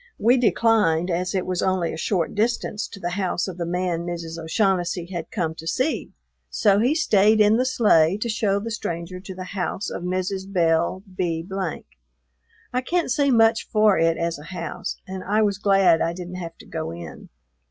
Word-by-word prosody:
We 240 +3 +4
declined, 215 -8 +2
as 180 +3 -1
it 185 - 0
was 180 -1 -1
only 185 -3 0
a - - -4
short 170 +1 -1
distance 215 -1 -1
to 200 - -11
the 175 -1 -3
house 185 -1 -1
of 180 -2 -7
the 170 - -2
man 180 -1 -1
Mrs. 170 -1 -5
O'Shaughnessy 175 0 0
had 170 -2 -5
come 170 -6 -2
to 160 0 -10
see, 260 - -1 0.4
so 200 -2 +3
he 250 +7 +2
stayed 215 - +4
in 210 +1 +5
the 255 +1 +1
sleigh 195 -8 +4
to 215 - -3
show 215 -3 +1
the 230 +3 -5
stranger 175 -4 -4
to 190 0 -9
the 185 - -6
house 190 0 -3
of - - -5
Mrs. 185 +2 -3
Belle 170 +1 +1
B. 170 -2 -2 1.3
I 250 - +1
can't 340 +2 -1
say 280 +2 +2
much 225 -2 +4
for 215 -2 +3
it 165 0 +2
as 170 -2 -2
a 150 - -11
house, 170 -2 -5
and 190 0 -6
I 215 +3 +2
was 200 -2 0
glad 195 -5 +4
I 170 - 0
didn't 180 0 -7
have 170 -2 -7
to - - -14
go 160 -1 -4
in. 85 -1 -9
185 Hz, 195 wpm, -23 LUFS, 170-215 Hz, 1.3 s, in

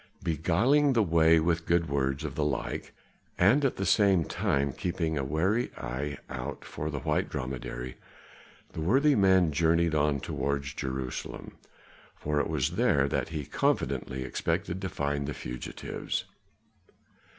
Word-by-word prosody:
Beguiling 105 - +3
the 115 -3 +4
way 80 -2 +5
with 80 +1 0
good 85 -1 +2
words 70 +1 -1
of 75 -3 -4
the 75 - -1
like, 70 -4 -2 0.5
and 115 +11 +4
at 135 - +2
the 95 - -2
same 95 -5 +4
time 70 -1 0
keeping 85 -1 -2
a 70 - -1
wary 95 - +1
eye 70 +4 -4
out 65 +2 -6
for 75 - -4
the 75 -3 -4
white - - 0
dromedary, 65 -1 -5 0.8
the - - -4
worthy 135 - +4
man 95 - +4
journeyed 85 +2 +2
on 75 -2 +2
towards 70 +1 -2
Jerusalem, 65 -3 -5 0.6
for 75 0 -1
it - - -1
was 80 +2 -1
there 70 - +3
that - - -1
he 75 -3 -4
confidently 65 -1 -1
expected 85 +7 -2
to 95 - -2
find 70 -2 -2
the 75 - -4
fugitives. 60 0 -5
80 Hz, 145 wpm, -29 LUFS, 70-90 Hz, 0.8 s, way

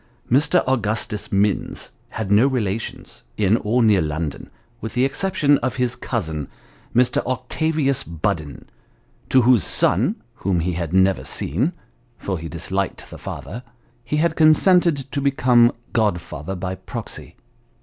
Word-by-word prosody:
Mr. 150 +7 +4
Augustus 110 -4 -1
Minns 100 0 0 0.2
had 110 -3 -4
no 110 +6 +5
relations, 110 -5 -3 0.2
in 105 +2 +3
or 115 +3 +1
near 105 -4 +4
London, 75 -1 -4 0.3
with 110 - -6
the 125 +1 +3
exception 145 -1 +1
of 130 +1 -2
his 125 -2 -1
cousin, 80 - -3 0.5
Mr. 125 +1 +3
Octavius 135 +2 -1
Budden, 80 - -4 0.6
to 130 -2 +4
whose 120 -3 +5
son, - - +3 0.2
whom 90 -3 0
he 90 +2 -1
had 85 -2 -3
never 95 -5 +3
seen 95 - -1 0.4
(for 95 -4 -4
he 80 0 -7
disliked 95 +5 -4
the - - -9
father) 120 - -7 0.4
he 150 +5 -2
had 160 +1 +1
consented 165 +1 +4
to 140 - -2
become 125 -3 +4 0.2
godfather 90 - -1
by 90 +1 -4
proxy. 95 - -8
110 Hz, 135 wpm, -21 LUFS, 95-130 Hz, 0.6 s, no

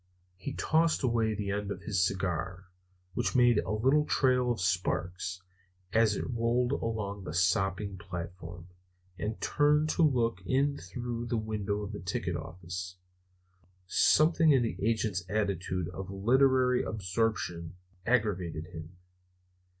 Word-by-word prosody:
He 95 - -6
tossed 160 -1 +2
away 115 -3 +1
the 100 -1 -3
end 100 0 -2
of 100 -2 -5
his 95 -5 +1
cigar, 95 -1 -2 0.5
which - - -1
made 120 -3 +5
a 85 - -4
little 130 +8 +3
trail 125 -4 +2
of 120 - -2
sparks 90 0 -1 0.5
as 110 -2 +4
it - - -3
rolled 120 +1 +1
along 110 -6 -3
the 80 -3 -6
sopping 95 +2 +1
platform, 85 -1 -7 0.5
and 105 +1 -3
turned 150 +1 +2
to 170 - 0
look 120 - +2
in 140 +5 +1
through 120 +6 -5
the 115 - 0
window 105 -1 -2
of 100 - -5
the 105 - -6
ticket 90 0 -2
office. 90 +2 -6 0.9
Something 155 - +4
in 130 -3 +4
the 115 - -2
agent's 110 -4 0
attitude 95 -4 -1
of 95 +1 -7
literary 125 +5 +3
absorption 95 -5 -2 0.3
aggravated 95 -9 0
him. 80 +2 -9
105 Hz, 135 wpm, -30 LUFS, 90-120 Hz, 0.9 s, made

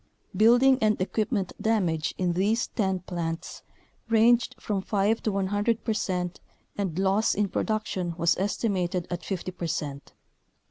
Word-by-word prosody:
Building 245 +4 +5
and 215 -1 +2
equipment 200 0 -1
damage 180 -8 0
in 180 -2 0
these 205 +6 +1
10 190 -4 -1
plants 170 -2 -5 0.5
ranged 230 +2 +4
from 200 -3 -2
five 205 +3 +1
to 215 - 0
100 205 +4 0
percent 180 -5 -2 0.4
and 190 -5 -3
loss 195 +3 +2
in 205 0 +1
production 190 -5 -2
was 170 0 +3
estimated 185 -3 -1
at 175 - -3
50 185 -1 -4
percent. 150 -5 -4
195 Hz, 130 wpm, -27 LUFS, 180-215 Hz, 0.5 s, Building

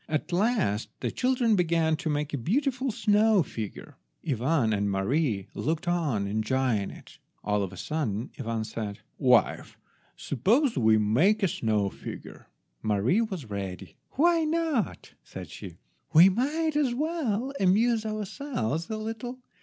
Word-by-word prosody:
At 155 +2 -2
last 190 - +1
the - - -1
children 250 -3 +2
began 165 -3 +2
to 160 - -3
make 150 0 -2
a - - 0
beautiful 265 - 0
snow 215 -3 +3
figure. 110 -6 -7 0.3
Ivan 130 -3 +1
and 100 0 0
Mary 100 - 0
looked 160 +2 -2
on 155 -13 0
enjoying 110 +1 0
it. - - -14 0.2
All 105 0 +1
of 95 -2 -3
a 95 - -11
sudden 120 - -3
Ivan 115 -3 -2
said— 105 -2 -5 0.2
"Wife, 125 -3 +2 0.4
suppose 225 - +1
we 110 -2 +4
make 150 - +3
a - - +5
snow 105 - 0
figure?" - - -9 0.3
Mary 110 - +2
was 190 - -4
ready. 95 -2 -6 0.2
"Why 335 +3 +3
not?" 310 - -1
said - - -9
she; - - -9 0.4
"we 170 +5 +9
might 295 - 0
as 275 -5 +1
well 275 -5 -1
amuse 220 +4 +3
ourselves 215 - -3
a 220 - -2
little. 225 +3 -5
165 Hz, 140 wpm, -27 LUFS, -, 0.4 s, we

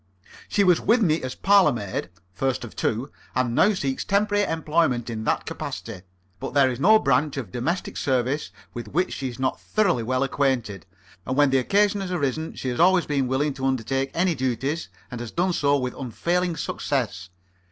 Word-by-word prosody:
She 205 - +2
was 180 -3 +4
with 230 0 +3
me 160 -3 +2
as 130 0 -5
parlour 195 -5 +5
maid 100 -7 -4 0.2
(first 130 +4 -1
of 120 - -9
two), 120 +6 -1 0.2
and 125 -2 +1
now 205 - +4
seeks 135 -6 -2
temporary 205 +1 +2
employment 155 -7 0
in 110 -1 -4
that - - 0
capacity; 105 -5 -6 0.4
but - - -6
there 135 -2 +5
is 125 - -5
no 215 +9 +6
branch 140 -3 +1
of 115 -9 -5
domestic 160 +10 -2
service 130 +1 0 0.2
with 120 -3 -6
which 175 - 0
she 135 -2 -3
is 120 - -9
not 130 0 -1
thoroughly 195 - +1
well 130 +3 0
acquainted, 125 - -1 0.4
and 130 - -3
when 145 -2 +4
the 135 - +4
occasion 200 +8 +2
has 185 -2 -4
arisen 155 -1 -2
she 130 - -4
has 120 - -3
always 180 +1 +5
been 140 -3 0
willing 140 +3 0
to 135 0 -4
undertake 135 +1 -1
any 175 +1 +2
duties, 130 - -2 0.2
and 120 -1 -5
has 120 - -5
done 180 +6 0
so 145 -3 +2
with 125 -2 -2
unfailing 170 +7 -1
success. 115 -10 -2
135 Hz, 190 wpm, -24 LUFS, 125-170 Hz, 0.4 s, no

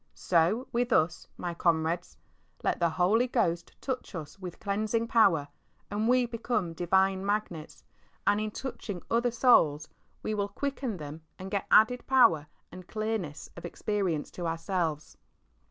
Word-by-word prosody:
So 185 +9 +2
with 240 +1 0
us, 160 -6 +2
my 175 -1 -3
comrades. 170 0 0 0.5
Let - - 0
the 170 -1 +3
Holy 190 +9 +2
Ghost 175 -9 0
touch 255 -6 -4
us 160 +3 -7
with 180 -3 -8
cleansing 215 +3 -1
power, 180 -11 +4 0.4
and 210 +2 0
we 250 0 +4
become 230 -6 -2
divine 190 +3 +2
Magnets, 200 -6 -3 0.4
and 205 +1 +3
in 215 - -1
touching 210 -6 -6
other 235 +1 +3
souls 155 - +4 0.4
we 215 - -1
will 205 -1 -1
quicken 265 -1 -3
them 150 0 -8 0.2
and 190 +1 -8
get 200 - -1
added 245 +3 +5
power 230 - +5 0.2
and 185 -1 -11
clearness 215 -9 -3
of 170 - -10
experience 190 -8 -2
to 175 -2 -4
ourselves. 165 -2 -2
195 Hz, 145 wpm, -29 LUFS, 170-225 Hz, 0.5 s, added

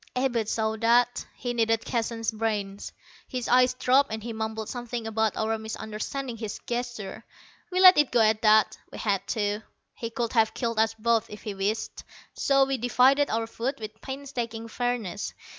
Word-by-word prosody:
Abud 245 -4 0
saw 220 -1 0
that. 240 +2 +2
He 245 -1 -3
needed 225 -1 +1
Keston's 230 -1 -1
brains. 210 -3 -3 0.4
His 250 -3 -4
eyes 250 +1 +4
dropped, 260 +1 +3
and 220 -1 -4
he 235 0 -5
mumbled 220 0 -4
something 240 -2 -5
about 220 -1 0
our 220 0 0
misunderstanding 220 +4 -5
his 220 -2 -5
gesture. 240 -4 -4 0.5
We 365 - 0
let 370 -3 +9
it 295 - +4
go 235 - +4
at 220 0 +3
that. 215 -1 +4
We - - -8
had 200 -2 -1
to. 205 -2 -1 0.3
He 230 - -5
could 230 0 -3
have 225 -2 +3
killed 230 -3 -1
us 225 0 +2
both 225 0 +1
if 210 - -10
he 210 - -4
wished. 200 +3 -2 0.3
So 275 -1 +3
we 270 -1 -2
divided 260 +4 +4
our 225 +1 0
food 235 +4 -3
with 215 0 -8
painstaking 240 -5 -5
fairness. 230 -6 -3
225 Hz, 175 wpm, -27 LUFS, 220-245 Hz, 0.5 s, let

